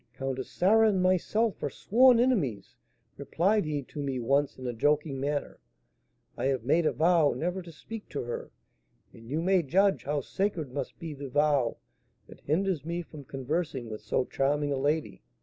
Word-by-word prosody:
'Countess 135 0 -4
Sarah 220 +4 +4
and 195 -3 +1
myself 185 +4 +1
are 145 - -1
sworn 245 - +4
enemies,' 200 - 0 0.4
replied 175 +8 +1
he 150 -2 -2
to 145 +3 -7
me 135 -2 -2
once 140 +4 +1
in 130 - -8
a 120 - -2
joking 145 +3 +1
manner; 145 +1 -3 0.8
'I - - -1
have 135 -3 0
made 155 +6 +3
a - - +2
vow 165 -3 +3
never 180 +3 -2
to 170 -1 -11
speak 215 +7 -9
to 145 - -4
her; 120 0 -5 0.6
and 115 +1 -14
you 155 +4 -1
may 190 0 +3
judge 190 +6 +2
how 145 +1 0
sacred 180 -3 -2
must 140 - -5
be 165 -2 -6
the 140 -1 -7
vow 145 -3 +2 0.5
that - - -14
hinders 170 0 0
me 170 +2 -3
from 150 -3 -12
conversing 135 -2 -3
with 105 - -6
so 130 - 0
charming 145 +1 0
a - - -1
lady.' 145 +3 -1
150 Hz, 180 wpm, -29 LUFS, 135-180 Hz, 0.8 s, Sarah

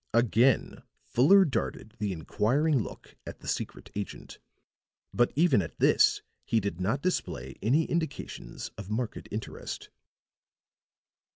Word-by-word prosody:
Again 120 +2 +3 0.2
Fuller 145 - +5
darted 115 -5 -3
the 105 -2 -1
inquiring 130 - +1
look - - -9
at - - -8
the - - -10
secret - - -4
agent; 100 -1 -6 0.7
but 120 +4 +3
even 160 - +4
at 80 -6 -7
this - - +4 0.2
he 115 - +2
did 100 -4 -3
not 115 +10 0
display 65 - -2
any 140 +10 +3
indications 165 -1 -4
of 100 -2 -7
marked 110 +1 -3
interest. 105 +1 -6
115 Hz, 120 wpm, -29 LUFS, 100-140 Hz, 0.7 s, Fuller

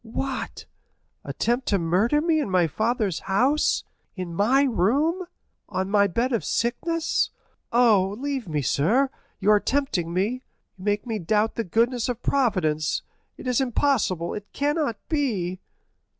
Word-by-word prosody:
What?—attempt 245 0 -5
to 200 - +3
murder 195 - +2
me 325 -1 +2
in 285 - -2
my 180 -2 +3
father's 215 - -1
house, 255 +10 +2 0.3
in 180 -3 -5
my 240 +10 +3
room, 280 - +1 0.4
on 190 +1 -2
my 200 -1 +4
bed 235 +7 -1
of 230 - 0
sickness? 325 +8 0 0.4
Oh, 215 -5 +4
leave 275 -4 -3
me, 150 -2 -1
sir; 230 - +2 0.3
you 205 +1 +3
are 210 - +6
tempting 230 -11 -1
me—you 205 +8 -1 0.4
make 205 +2 0
me 225 -3 -3
doubt 210 +5 +1
the 230 - -2
goodness 235 +6 +1
of 245 -1 -4
Providence—it 185 - -1
is 250 +1 +1
impossible, 235 - +1
it 210 0 -8
cannot 290 -3 0
be!" 205 - -1
225 Hz, 135 wpm, -25 LUFS, 190-270 Hz, 0.4 s, are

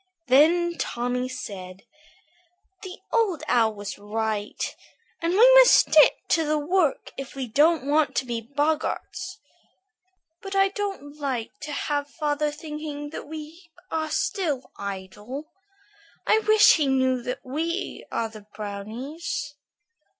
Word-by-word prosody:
Then 335 +6 +4
Tommy 245 +1 -2
said: 190 -7 -8 1.0
"The 375 -1 -8 0.2
Old 420 -9 +1
Owl 225 -3 +3
was 205 0 -6
right, 210 0 -3 0.5
and 335 +1 0
we 485 +6 +7
must - - +9
stick - - +5
to 325 - +3
the 305 0 +1
work 315 0 0
if 275 0 -7
we 270 -1 -3
don't 300 +5 +3
want 295 +1 +2
to 265 - 0
be 235 -2 -3
boggarts. 310 - -2 1.0
But 390 0 -6
I 390 0 +4
don't 385 -8 -5
like 260 -6 -2
to 290 +1 -6
have 290 0 -2
father 300 -1 -1
thinking 300 -1 -6
that - - -7
we 315 +3 -9 0.2
are 315 -1 -1
still 320 -6 -1
idle. 200 +9 -7 0.7
I 435 - +4
wish 430 -3 +7
he 300 -3 +1
knew 260 -1 +2
that 250 +1 -5
we 330 +8 -3
are 230 - -1
the 215 -2 -13
brownies." 255 - -5
290 Hz, 130 wpm, -25 LUFS, 245-335 Hz, 1.0 s, must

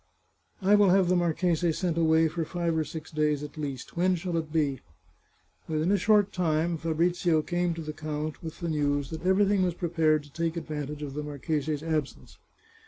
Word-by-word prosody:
" - - -40
I 195 +2 +4
will 205 -2 +6
have 185 -1 +4
the 185 - +4
marchese 175 0 +1
sent 175 0 -1
away 160 -1 +4
for 165 +1 -3
live 170 -2 0
or 160 - +1
six 155 +1 -8
days 150 -2 0
at 150 +1 -8
least. 140 -4 -6
When 180 +2 +2
shall 175 0 -3
it 160 -2 -3
be? 145 -5 0 0.5
" - - -33
Within 160 +3 +1
a 205 - +4
short 205 0 +3
time 165 -1 +1
Fabrizio 165 0 +1
came 175 +1 -1
to 165 - -6
the 155 0 -5
count 155 0 -4
with 160 +2 -8
the 170 - -2
news 145 -2 0
that 160 +3 -4
everything 200 +1 +3
was 180 -2 +1
prepared 160 -3 +1
to 145 -1 -17
take 165 0 -2
advantage 150 -2 -5
of 140 -2 -5
the 150 - -3
marchese's 150 0 -2
absence. 155 -3 -3
160 Hz, 200 wpm, -28 LUFS, 150-175 Hz, 0.5 s, will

